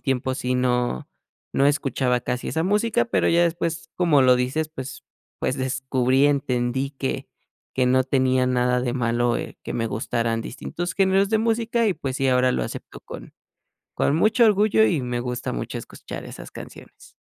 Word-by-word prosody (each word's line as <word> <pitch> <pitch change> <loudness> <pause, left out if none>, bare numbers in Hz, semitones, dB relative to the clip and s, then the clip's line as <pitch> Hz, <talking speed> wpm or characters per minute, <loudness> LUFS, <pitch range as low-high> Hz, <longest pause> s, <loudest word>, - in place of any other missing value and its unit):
tiempo 130 -1 -1
sí 125 0 -2
no 125 - 0 0.4
no 140 - +3
escuchaba 135 -3 +1
casi 125 +1 -3
esa 160 +1 -1
música, 215 +4 +2
pero 235 - +1
ya 170 +1 +4
después, 165 -1 -2
como 165 -6 +4
lo 130 -1 +6
dices, 130 +6 -1
pues 135 -4 -8 0.4
pues 130 - -1
descubrí 130 0 +1
y - - +7
entendí 135 -2 0
que 135 -1 -4 0.5
que 130 -1 +2
no 130 +1 +3
tenía 130 -1 +2
nada 125 0 +2
de 125 -1 -1
malo, 120 -1 +1
eh, - - -6
que - - -4
me 115 -1 -1
gustaran 115 +1 -1
distintos 175 +9 -5
géneros 195 0 +3
de 220 - +3
música 230 +1 +1
y, - - +2
pues, 135 -5 -4
sí, 135 0 +1
ahora 125 0 +3
lo - - -1
acepto - - -8
con - - -10 0.6
con 140 - +2
mucho 215 +7 +4
orgullo 215 +1 +4
y 160 -9 +1
me 125 -1 -2
gusta 125 0 -3
mucho - - -4
escuchar - - -9
esas - - -10
canciones. - - -12
130 Hz, 175 wpm, -23 LUFS, 125-170 Hz, 0.6 s, y